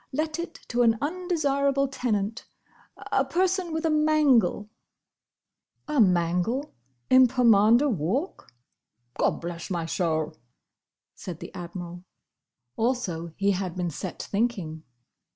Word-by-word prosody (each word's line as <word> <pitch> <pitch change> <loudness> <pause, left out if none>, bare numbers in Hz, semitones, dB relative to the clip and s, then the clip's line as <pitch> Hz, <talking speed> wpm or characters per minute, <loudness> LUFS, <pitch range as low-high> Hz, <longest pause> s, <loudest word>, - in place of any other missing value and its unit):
Let 310 +3 -2
it 340 - -5
to 245 0 +1
an 230 -1 +4
undesirable 285 -5 0
tenant: 225 -5 -2 0.6
a - - +3
person 370 -1 0
with 320 +1 -2
a 320 - +2
mangle." 300 -8 +3 1.2
A 300 -2 0
mangle 180 - +1 0.4
in 255 0 +8
Pomander 235 +1 +4
Walk! 215 - -2 0.7
"Gobblessmysoul!" 165 -2 -1 0.8
said 175 -3 -8
the - - -9
Admiral. 175 0 -7 0.7
Also 220 -9 -1
he 200 0 +2
had 185 -2 -3
been 175 -2 -2
set 180 +4 -6
thinking. 200 -8 -2
230 Hz, 100 wpm, -26 LUFS, 180-285 Hz, 1.2 s, in